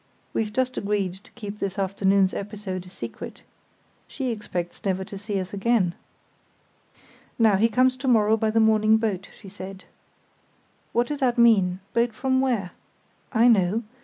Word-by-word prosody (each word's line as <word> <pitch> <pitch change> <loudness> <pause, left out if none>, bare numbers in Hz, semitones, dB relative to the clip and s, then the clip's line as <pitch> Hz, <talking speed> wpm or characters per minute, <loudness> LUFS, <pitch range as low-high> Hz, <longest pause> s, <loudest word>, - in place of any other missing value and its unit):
We've 215 -1 -1
just 255 +2 -1
agreed 200 -3 -1
to - - -18
keep 210 -3 -7
this 195 0 -3
afternoon's 195 0 +2
episode 195 -3 -5
a - - -11
secret. 185 - -8 0.6
She 260 -3 -3
expects 180 -6 -5
never 190 -1 0
to 195 - -9
see 200 0 -3
us 185 +1 -6
again." 200 -3 +1 1.4
"Now, 220 -3 +5
he 220 +4 +3
comes 255 +3 +3
to 265 +1 -5
morrow 220 -3 +4
by 220 0 0
the 225 +1 +2
morning 220 0 +4
boat, 205 -4 -2
she 205 - -15
said. 190 0 -9 1.1
What 240 +1 +2
did 295 +2 -4
that 250 -2 +1
mean? 195 -6 +4
Boat 235 0 +1
from 260 +3 +1
where?" 230 -9 0 0.6
"I 235 0 +4
know. 215 0 +3
210 Hz, 160 wpm, -25 LUFS, 195-235 Hz, 1.4 s, Now